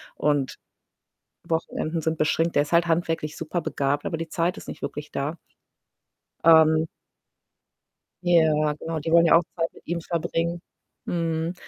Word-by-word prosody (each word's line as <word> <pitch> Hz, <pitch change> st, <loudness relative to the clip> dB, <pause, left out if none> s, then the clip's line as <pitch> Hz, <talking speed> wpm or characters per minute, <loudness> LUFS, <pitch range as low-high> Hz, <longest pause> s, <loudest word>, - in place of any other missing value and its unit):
und 145 Hz, -3 st, 0 dB, 0.9 s
Wochenenden 160 Hz, 0 st, -2 dB
sind 160 Hz, 0 st, -1 dB
beschränkt. 165 Hz, +2 st, +1 dB
Der 145 Hz, -, +4 dB
ist 150 Hz, -, -10 dB
halt 170 Hz, 0 st, +4 dB
handwerklich 165 Hz, -2 st, -1 dB
superbegabt, 145 Hz, -4 st, -2 dB
aber 165 Hz, -, -2 dB
die 165 Hz, 0 st, -5 dB
Zeit 175 Hz, +3 st, 0 dB
ist -, -, -10 dB
nicht -, -, -8 dB
wirklich 150 Hz, 0 st, -6 dB
da. 145 Hz, +4 st, -3 dB, 1.1 s
Ähm 160 Hz, -1 st, +6 dB, 1.4 s
Ja, 155 Hz, -4 st, +3 dB
genau, 160 Hz, +2 st, -4 dB
die 160 Hz, +2 st, -3 dB
wollen 170 Hz, 0 st, +7 dB
ja 165 Hz, -, +5 dB
auch 170 Hz, -, +6 dB
Zeit 165 Hz, -1 st, 0 dB
mit -, -, -17 dB
ihm 170 Hz, +1 st, -2 dB
verbringen. 170 Hz, +1 st, -2 dB, 0.5 s
Mhm. 165 Hz, 0 st, -1 dB
165 Hz, 145 wpm, -25 LUFS, 155-170 Hz, 1.4 s, wollen